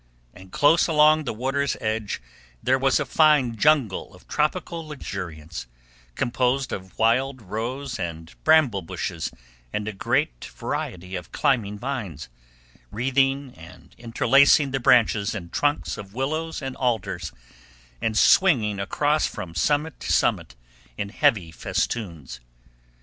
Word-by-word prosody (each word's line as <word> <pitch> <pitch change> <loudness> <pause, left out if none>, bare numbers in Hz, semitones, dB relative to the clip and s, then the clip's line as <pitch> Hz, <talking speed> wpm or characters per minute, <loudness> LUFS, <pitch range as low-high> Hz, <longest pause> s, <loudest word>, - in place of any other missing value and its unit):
And 95 0 -14
close 160 +3 +4
along 155 -1 +4
the - - -1
water's 135 +4 -1
edge 110 - -3 0.4
there 130 +1 +2
was 135 -1 +3
a - - -1
fine 150 -7 +3
jungle 130 -8 +1
of 90 - -19
tropical 165 +1 -2
luxuriance, 85 - -7 0.5
composed 125 +2 0
of 95 -1 -8
wild 130 +4 +2
rose 120 +6 -4
and 80 -2 -5
bramble 155 -11 +4
bushes 80 -1 -4 0.4
and 105 0 -3
a 110 - -3
great - - -1
variety 90 +1 -5
of 90 -2 -7
climbing 105 -6 0
vines, 110 - -5 0.6
wreathing 135 +3 0
and 85 +3 -15
interlacing 135 +4 +4
the 135 - -1
branches 110 -4 +3
and 85 -5 -7
trunks 145 0 0
of 100 0 -10
willows 155 +4 -2
and 135 -1 -4
alders, 100 - -1 0.7
and 110 -1 0
swinging 110 - +4
across 145 +10 +1
from 85 -2 -7
summit 145 - 0
to - - -3
summit - - +1 0.4
in 105 -1 -3
heavy 110 - +1
festoons. 90 - -3
120 Hz, 130 wpm, -24 LUFS, 95-140 Hz, 0.7 s, close